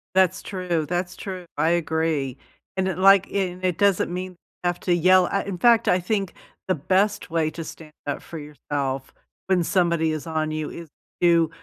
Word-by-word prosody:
That's 190 -1 +3
true, 180 -5 -2
that's 180 0 -2
true, 185 -3 -6
I 160 +2 +3
agree, 160 -5 0 0.4
and 190 0 +1
it, 185 -2 -2
like, 195 0 +6
and 185 -2 -2
it 180 -3 0
doesn't 200 -3 +2
mean 185 +1 -4
you 175 - -20 0.3
have 175 0 0
to 180 - +1
yell, 185 +1 +5
ah 200 - 0
in 195 -3 -5
fact, 235 +2 +4
I 180 - +4
think 195 0 -1 0.3
the 185 - +3
best 190 +8 +1
way 160 -1 +1
to 165 - -6
stand 160 -1 -10 0.2
up 145 - -2
for 165 - -8
yourself 140 -2 -4 0.3
when 185 -2 +3
somebody 170 -3 +2
is 155 0 -4
on 155 -1 -1
you 155 -1 -3
is 170 -2 -9 0.3
to 170 -2 +4
175 Hz, 190 wpm, -24 LUFS, 160-185 Hz, 0.4 s, like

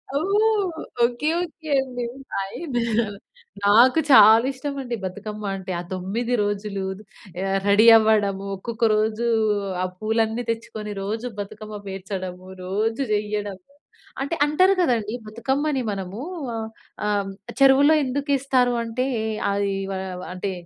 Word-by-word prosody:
ఓహ్! 395 0 +1 0.2
Okay. 240 +5 0
Okay. 320 -2 -7
అండి. 250 -2 -5 0.3
Fine. 220 - -4 0.9
నాకు 240 +9 +6
చాలా 220 +1 +8
ఇష్టం 280 +2 -5
అండి 245 -2 -3
బతుకమ్మ 210 +3 -6
అంటే. 190 -1 -6
ఆ - - -3
9 215 +7 -2
రోజులు 205 -1 -3 0.6
ఆహ్, 195 0 +1
రెడీ 210 +3 +6
అవ్వడము. 205 -3 +2
ఒక్కొక్క 230 +3 -2
రోజు 220 +2 0 0.6
ఆ - - +1
పూలన్నీ 225 +2 0
తెచ్చుకొని 220 -2 -4
రోజు 220 +4 -3
బతుకమ్మ 210 +1 -7
పేర్చడము. 185 -1 -6 0.2
రోజు 220 +6 -1
చెయ్యడము. 205 -2 -2 0.6
అంటే 280 +5 -1
అంటారు 370 +6 +4
కదండీ 230 -8 +1
బతుకమ్మని 265 +5 -1
మనము 195 +3 -5 0.8
ఆహ్, 200 -1 0 0.3
చెరువులో 275 +3 +6
హ్మ్. 310 - +4
ఆహ్, - - +1
ఎందుకు 280 +3 -2
ఇస్తారు 255 -2 +2
అంటే 240 +3 -2 0.5
అది 200 0 0 0.2
ఆహ్, 185 -1 -5
అంటే 190 +1 -3
220 Hz, 120 wpm, -23 LUFS, 200-260 Hz, 0.9 s, చాలా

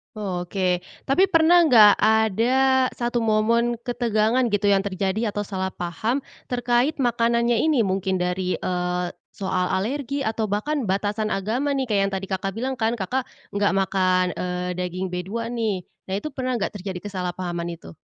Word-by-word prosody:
Oke. 180 -2 -1 0.2
Tapi 335 +9 +3
pernah 335 0 +5
enggak, 220 -7 +8
ada 235 +5 +3
satu 240 0 -1
momen 230 +2 +2
ketegangan 240 0 +1
gitu 205 -2 +1
yang 195 - +4
terjadi, 200 +3 -1
atau 205 - -2
salah 190 -2 -3
paham 215 +10 -2 0.2
terkait 245 +3 +1
makanannya 235 -2 +2
ini? 300 -7 +3
Mungkin 190 -1 0
dari, 180 +1 -1
eee, 180 0 -2 0.3
soal 185 -2 0
alergi, 275 +7 -2
atau 220 0 -1
bahkan 250 +6 -1
batasan 205 +2 0
agama 220 +9 -1
nih? 265 -1 0
Kayak 205 -2 +2
yang - - -10
tadi 190 - -3
Kakak 190 +1 -2
bilang 260 +3 -1
kan, 225 +1 +1
Kakak 250 +6 -2 0.3
nggak 200 -1 +2
makan, 185 -1 +2
eee, 180 0 -3
daging 180 +1 -3
B2 200 +6 -4
nih. 220 -6 -1 0.2
Nah 190 - -2
itu 305 +9 -4
pernah 255 -2 -2
nggak, 205 - -1
terjadi 190 -2 -5
kesalahpahaman 180 -3 -4
itu? 165 - -13
210 Hz, 155 wpm, -23 LUFS, 190-240 Hz, 0.3 s, enggak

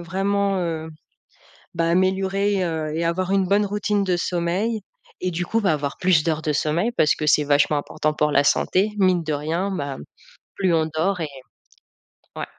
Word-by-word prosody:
vraiment, 195 +3 0
heu, 165 -3 -3 0.9
bah, 165 0 0
améliorer, 190 +2 +1
heu, 160 -3 -3
et 165 +1 -1
avoir 185 +2 -1
une 195 -1 +2
bonne 200 +3 +3
routine 205 0 0
de 180 -2 +1
sommeil 180 +7 -1 0.4
et 185 - 0
du 175 +1 -3
coup, 225 +4 0
bah 190 - +3
avoir 145 -2 -2
plus 180 -4 +3
d'heures 160 -2 -1
de 155 - 0
sommeil 155 +9 0
parce 150 - +4
que 155 - -4
c'est 150 0 +4
vachement 145 +1 +3
important 155 +1 -2
pour 150 0 0
la 140 0 +4
santé, 190 +7 +2
mine 185 -3 +3
de 155 - -3
rien, 160 +7 -2
bah, 140 -7 -4
mmh, - - -10 0.5
plus 185 -3 +1
on 160 -1 +2
dort 180 +3 0
et 155 - -2 1.1
ouais. - - -3
175 Hz, 185 wpm, -22 LUFS, 155-195 Hz, 1.1 s, parce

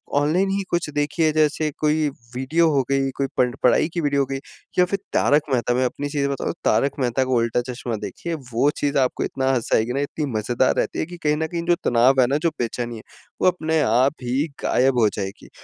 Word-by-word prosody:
Online 160 +7 +2
ही 195 0 -1
कुछ 175 -3 -1
देखिए 155 +2 +1
जैसे 155 0 +2
कोई 155 0 +2 0.3
वीडियो 155 +6 +2
हो 140 -2 +3
गई, 135 0 +1
कोई 140 - 0
पढ़ 125 -1 +2
पढ़ाई 125 +5 +4
की 170 - -1
वीडियो 145 -2 +1
हो - - +1
गई 135 0 -3 0.4
या 180 - +7
फिर 195 +2 -2
तारक 145 +2 +3
मेहता 120 -1 +1
मैं 130 +1 +2
अपनी 145 +3 -3
चीज़ें 140 -1 -1
बताऊँ 135 - -2
तारक 140 - +3
मेहता 125 0 +1
का 130 - -4
उल्टा-चश्मा 120 0 -1
देखिए, 170 - -5 0.2
वो 135 +5 +3
चीज़ 145 -1 0
आपको 130 - 0
इतना 135 0 -1
हँसाएगी 120 -1 +1
ना, 140 - -1
इतनी 145 +2 -3
मज़ेदार 120 +4 +1
रहती - - -1
है - - 0
कि 175 +2 -10
कहीं 150 0 +2
न 160 0 -1
कहीं 170 +1 -4
जो 175 0 +3
तनाव 130 +2 +4
है 125 - +4
ना, 140 +3 +1
जो 165 +2 +1
बेचैनी 120 0 -3
है, 110 - -9 0.4
वो - - +4
अपने 160 -3 +1
आप 130 +3 +3
ही 130 +5 0 0.2
गायब 125 -1 +2
हो 110 - +5
जाएगी। 95 -1 -6
140 Hz, 220 wpm, -22 LUFS, 125-155 Hz, 0.4 s, या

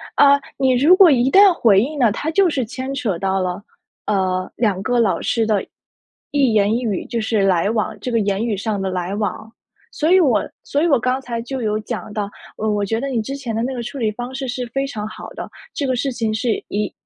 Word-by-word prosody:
啊， 280 0 +6 0.2
你 260 -1 +3
如 295 +9 +6
果 375 -2 +7
一 260 -2 +3
旦 395 0 +7
回 215 - +4
应 295 +6 -3
呢， 240 -6 +3
它 290 +9 -3
就 390 +3 +4
是 275 -5 -1
牵 260 +4 -5
扯 225 -9 -2
到 195 +1 0
了， 180 +2 -3 0.4
呃， 185 -2 0
2 205 -5 0
个 245 +1 +1
老 220 -5 +2
师 230 -2 0
的 210 -3 +1 0.7
一 275 -5 +2
言 210 0 +3
一 240 - -1
语， 210 -6 -1
就 235 - -3
是 220 -1 0
来 190 -1 +2
往 220 -2 -2
这 250 - -4
个 230 - +2
言 200 +1 0
语 225 -3 -1
上 205 +1 -2
的 190 - -1
来 180 +1 -3
往。 215 +1 -4 0.4
所 315 +2 0
以 375 - +7
我 255 - +2 0.2
所 285 - -1
以 - - +3
我 280 -6 +3
刚 255 +3 0
才 235 -3 -4
就 260 +2 -5
有 215 -1 0
讲 215 0 -6
到， 205 -2 -3 0.3
呃， 220 - -1
我 205 -1 0
觉 225 +3 -1
得 275 - -3
你 250 -4 -1
之 270 +6 -5
前 250 -5 -5
的 225 - -1
那 260 +2 -2
个 245 - -4
处 260 - -7
理 225 -4 0
方 245 +4 -7
式 265 0 -4
是 250 0 -3
非 270 +3 -2
常 215 -6 -5
好 - - -9
的， - - -7 0.2
这 285 - -2
个 260 - +1
事 265 +3 -1
情 230 -3 -2
是 225 +2 0 0.2
一 205 0 -2
230 Hz, 260 characters per minute, -20 LUFS, 210-265 Hz, 0.7 s, 果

